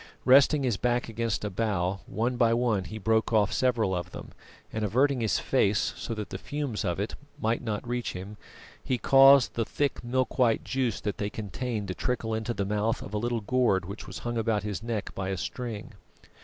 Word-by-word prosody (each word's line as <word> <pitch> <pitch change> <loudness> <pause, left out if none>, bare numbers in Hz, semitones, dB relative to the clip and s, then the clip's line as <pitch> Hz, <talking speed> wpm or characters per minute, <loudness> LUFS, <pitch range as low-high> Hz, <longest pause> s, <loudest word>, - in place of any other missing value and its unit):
Resting 140 +2 +6
his 120 -6 +1
back 120 +1 0
against 115 -2 -2
a 105 - -3
bough, 95 -2 -1
one 115 +5 -1
by 115 -1 +3
one 115 -6 +1
he 110 - -7
broke 110 +2 +1
off 105 -2 +3
several 120 -6 +1
of 90 -1 -4
them, - - -9 0.4
and 110 - -2
averting 130 +5 +2
his 110 - +1
face - - +1
so 115 - -5
that 105 -1 -6
the - - -5
fumes 145 -7 -3
of 85 +1 -1
it 100 - -2 0.3
might 115 -1 0
not 110 -1 -3
reach 120 0 -2
him, 95 +3 -7 0.5
he 130 - 0
caused 135 +1 +6
the 115 - 0
thick 140 +4 -2
milk 130 +1 -1
white 115 -3 +3
juice 130 -4 -1
that 105 -2 -3
they 100 - -1
contained 110 0 -4
to - - -1
trickle 115 +1 -2
into 110 +2 -2
the 100 - -1
mouth 105 +2 0
of 100 - -9
a - - 0
little 120 0 -1
gourd 105 -5 +2
which 100 +4 -8
was - - -7
hung 120 -1 -1
about 110 -2 0
his 105 -1 -3
neck 115 -3 -3
by 95 0 -3
a 95 - -2
string. 115 +2 -5
115 Hz, 210 wpm, -28 LUFS, 105-125 Hz, 0.5 s, Resting